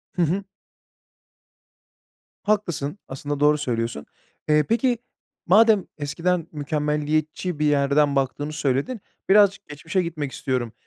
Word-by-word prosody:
Hı 180 - 0
hı. 180 +5 +1 2.0
Haklısın, 195 -5 -1
aslında 145 +2 -4
doğru 150 +1 +4
söylüyorsun. 115 - -3 0.4
Eee, 150 0 +5
peki, 240 +1 +2 0.5
madem 210 +1 +5
eskiden 165 +3 -1
mükemmeliyetçi 150 +2 -1
bir 150 - +2
yerden 145 0 +3
baktığını 145 +3 -1
söyledin, 150 - -1 0.3
birazcık 200 0 +4
geçmişe 155 +5 -2
gitmek 155 -5 -4
istiyorum. 125 -3 -2
150 Hz, 105 wpm, -23 LUFS, 145-180 Hz, 2.0 s, Eee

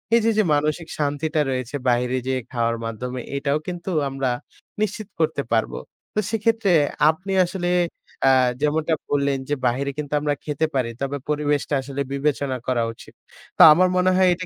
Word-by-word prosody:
এই - - +6
যে, 230 - +4
যে, 215 - +5
মানসিক 150 +3 0
শান্তিটা 150 +1 0
রয়েছে 130 0 -3
বাহিরে 125 +1 +1
যেয়ে 130 -1 0
খাওয়ার 115 -1 0
মাধ্যমে 125 +3 -4 0.2
এটাও 140 +1 0
কিন্তু 175 +1 -5 0.2
আমরা 135 -1 -1 0.5
নিশ্চিত 215 0 -2
করতে 160 -3 +1
পারব। 110 -1 +1 0.4
তো - - +2
সেক্ষেত্রে 225 -2 +1 0.4
আপনি 185 +5 -2
আসলে 175 0 -3 0.5
অ্যা 135 - +6 0.3
যেমনটা 155 +2 +1 0.2
বললেন 140 -1 +1
যে 145 - +1
বাহিরে 135 +3 -1
কিন্তু 150 -1 -4
আমরা 150 0 +1
খেতে 150 +1 0
পারি 125 -3 +1
তবে 140 +1 -2
পরিবেশটা 150 -1 0
আসলে 140 +1 -5
বিবেচনা 140 -1 -1
করা 125 -2 +1
উচিত। - - -15 0.4
তা - - +9
আমার 185 +3 +3
মনে 185 +1 +3
হয় 185 0 +4
এটা 185 +1 -5
145 Hz, 165 wpm, -23 LUFS, 130-170 Hz, 0.5 s, তা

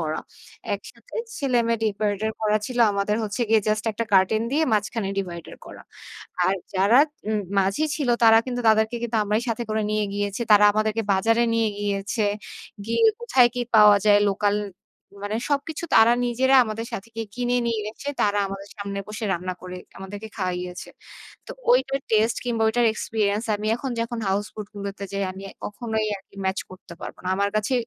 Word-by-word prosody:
করা। 155 -1 -2 0.5
একসাথে - - -12 0.2
ছেলে-মেয়ে 235 -4 +1
ডিভাইডার 210 0 -1
করা 215 -1 +2
ছিল, 250 -1 -5
আমাদের 200 +1 0
হচ্ছে 205 +2 -4
গিয়ে 220 -1 +5
জাস্ট 215 +1 0
একটা 230 +2 -2
কার্টেন 195 +3 +4
দিয়ে 310 +3 +3
মাঝখানে 205 0 0
ডিভাইডার 175 -3 -6
করা। - - -11 0.6
আর 190 - +2 0.2
যারা 200 +7 +5 0.3
উম 215 -1 +1 0.2
মাঝি 195 +11 +1
ছিল, 280 -5 -1
তারা 225 0 +8
কিন্তু 245 -1 -3
তাদেরকে 220 +2 +2
কিন্তু 235 -1 -1
আমরাই 210 +2 0
সাথে 230 +1 -2
করে 215 0 0
নিয়ে 215 0 +1
গিয়েছি। 205 +2 -2
তারা 210 0 +8
আমাদেরকে 215 +1 0
বাজারে 225 +5 +2
নিয়ে 225 -1 +2
গিয়েছে। 205 +2 -1 0.6
গিয়ে 230 - +2
কোথায় 265 - +4
কি 245 - -1
পাওয়া 210 -1 +8
যায়, 205 -1 +6
লোকাল 205 +1 +1 0.7
মানে 210 +2 -2
সবকিছু 290 +3 -2
তারা 225 +2 +7
নিজেরা 260 +3 +3
আমাদের 225 +1 -5
সাথে 195 - -5
গিয়ে 225 -1 -4
কিনে 245 0 0
নিয়ে 230 -2 0
এসে 280 +6 -6
তারা 205 0 +2
আমাদের 195 +1 -8
সামনে 200 -1 -4
বসে 215 +1 -5
রান্না 185 +1 -3
করে 180 0 -7 0.2
আমাদেরকে 200 +3 -8
খাওয়াইয়েছে। 180 -1 -4 0.6
তো - - -9 0.2
ঐটার 265 +2 +3
টেস্টে 220 +1 +2
কিংবা 230 -2 -1
ওইটার 235 +2 +2
এক্সপেরিয়েন্স 215 -1 -1
আমি 210 +1 -4
এখন 265 +2 -4
যখন 235 +1 -3
হাউস 200 +2 0
বোড 210 -2 -6
গুলোতে 200 0 -6
যাই 200 0 -1
আমি 190 - -10 0.2
কখনোই 220 0 -2
আর 195 - -15 0.2
ম্যাচ 190 0 0
করতে 185 -2 -12
পারবো - - -8
না। - - -2
আমার 200 0 +1
কাছে 215 +4 -1
215 Hz, 175 wpm, -24 LUFS, 200-230 Hz, 0.7 s, তারা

